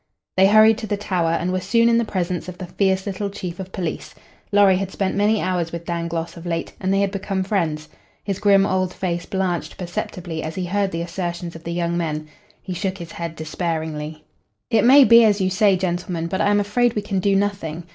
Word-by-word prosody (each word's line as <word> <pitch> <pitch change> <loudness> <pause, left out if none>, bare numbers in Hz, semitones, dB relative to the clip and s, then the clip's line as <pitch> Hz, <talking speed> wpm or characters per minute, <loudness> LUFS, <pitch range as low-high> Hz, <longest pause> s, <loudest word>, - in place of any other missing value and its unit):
They 190 +1 +6
hurried 215 +2 +6
to 220 - -5
the 205 - -1
Tower, 180 -5 0
and 170 +2 0
were 185 - 0
soon 230 +5 +3
in 235 0 +4
the - - +2
presence 180 -4 -3
of 180 - -9
the 185 - -6
fierce 190 +1 0
little 200 0 -3
chief 180 -3 -6
of 190 0 -7
police. 175 -5 -5 0.4
Lorry 200 -2 +5
had 195 0 -3
spent 190 0 -2
many 210 +2 +2
hours 180 -3 -1
with 170 0 -6
Dangloss 170 -1 -3
of 170 0 -9
late, 165 -1 -3
and 190 0 0
they 195 0 +2
had 200 -1 +1
become 195 -1 -2
friends. 165 -6 -1 0.4
His 200 -2 -3
grim 195 -1 +5
old 185 -2 -1
face 175 -2 -3
blanched 185 -3 -2
perceptibly 175 -2 -5
as 155 0 -5
he 185 - -2
heard 200 +2 0
the 170 -2 -3
assertions 175 -1 -4
of 165 - -10
the 170 - -3
young 170 0 -1
men. 155 -2 -3 0.4
He 185 - -5
shook 185 +2 -3
his 170 -2 -9
head 170 -1 -5
despairingly. 155 -1 -4 0.5
"It 225 - +4
may 275 +3 +8
be 235 -2 +7
as 210 -2 +3
you 190 -1 +1
say, 195 0 +3
gentlemen, 175 -2 -2
but 180 +3 -2
I - - +3
am 205 0 +3
afraid 225 +4 +1
we 210 - -1
can 200 -2 -1
do 195 +1 +2
nothing. 195 -5 -1
185 Hz, 225 wpm, -22 LUFS, 170-200 Hz, 0.5 s, may